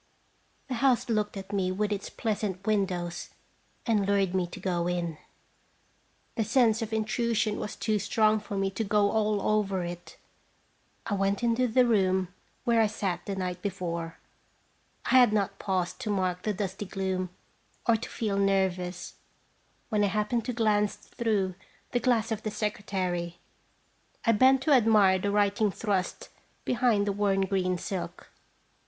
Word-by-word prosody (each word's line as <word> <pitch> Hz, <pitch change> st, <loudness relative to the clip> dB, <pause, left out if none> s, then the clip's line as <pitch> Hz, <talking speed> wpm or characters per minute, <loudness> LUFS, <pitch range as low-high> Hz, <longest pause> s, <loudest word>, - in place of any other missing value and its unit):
The 265 Hz, -, -3 dB
house 260 Hz, -3 st, +3 dB
looked 210 Hz, -2 st, 0 dB
at 195 Hz, +1 st, -8 dB
me 185 Hz, -2 st, +1 dB
with 210 Hz, +3 st, -1 dB
its 205 Hz, -1 st, -3 dB
pleasant 205 Hz, -4 st, -3 dB
windows, 185 Hz, -5 st, -1 dB, 0.6 s
and 210 Hz, -4 st, +2 dB
lured 200 Hz, -2 st, +2 dB
me 185 Hz, -2 st, +1 dB
to -, -, -9 dB
go 175 Hz, -2 st, -1 dB
in. 170 Hz, -3 st, -2 dB, 1.1 s
The 225 Hz, -, 0 dB
sense 225 Hz, 0 st, +3 dB
of 225 Hz, -1 st, -3 dB
intrusion 220 Hz, 0 st, 0 dB
was 210 Hz, -, -5 dB
too 215 Hz, -2 st, 0 dB
strong 215 Hz, +2 st, +2 dB
for 205 Hz, -1 st, -6 dB
me 195 Hz, 0 st, 0 dB
to 195 Hz, +4 st, -2 dB
go 205 Hz, -1 st, +2 dB
all 215 Hz, -1 st, +1 dB
over 200 Hz, -3 st, +1 dB
it. 175 Hz, -1 st, -7 dB, 0.9 s
I 205 Hz, -, -2 dB
went 195 Hz, +3 st, 0 dB
into 235 Hz, +2 st, +2 dB
the 245 Hz, +2 st, +4 dB
room 190 Hz, -5 st, +2 dB, 0.3 s
where 235 Hz, -2 st, +3 dB
I 220 Hz, -, +4 dB
sat 190 Hz, -4 st, -3 dB
the 200 Hz, -, -2 dB
night 180 Hz, -1 st, -3 dB
before. 170 Hz, -4 st, -4 dB, 0.9 s
I 260 Hz, -, +6 dB
had 245 Hz, -4 st, +6 dB
not 205 Hz, -2 st, 0 dB
paused 185 Hz, 0 st, -1 dB
to 245 Hz, -5 st, -4 dB
mark 185 Hz, -3 st, 0 dB
the 215 Hz, -, -1 dB
dusty 195 Hz, 0 st, -4 dB
gloom, 190 Hz, -2 st, -2 dB, 0.6 s
or 230 Hz, -, +5 dB
to 225 Hz, -, -5 dB
feei 205 Hz, -3 st, -1 dB
nervous, 185 Hz, -2 st, 0 dB, 0.8 s
when 210 Hz, -2 st, +2 dB
I -, -, +4 dB
happened 210 Hz, +3 st, 0 dB
to -, -, -1 dB
glance 210 Hz, -3 st, +1 dB, 0.2 s
througn 205 Hz, -5 st, 0 dB, 0.4 s
the 245 Hz, -, +1 dB
glass 235 Hz, -2 st, +1 dB
of 215 Hz, -1 st, -2 dB
the 215 Hz, -, -3 dB
secretary. 185 Hz, -5 st, -2 dB, 0.9 s
I 230 Hz, -, +5 dB
bent 260 Hz, +4 st, +5 dB
to 300 Hz, -, +1 dB
admire 215 Hz, -7 st, +5 dB
the 200 Hz, -, -1 dB
writing 205 Hz, +1 st, +2 dB
thrust 195 Hz, -2 st, -2 dB, 0.4 s
behind 235 Hz, -4 st, +2 dB
the 205 Hz, -, +1 dB
worn 200 Hz, -1 st, +1 dB
green 185 Hz, -2 st, 0 dB
silk. 190 Hz, +1 st, -6 dB
205 Hz, 160 wpm, -28 LUFS, 185-220 Hz, 1.1 s, I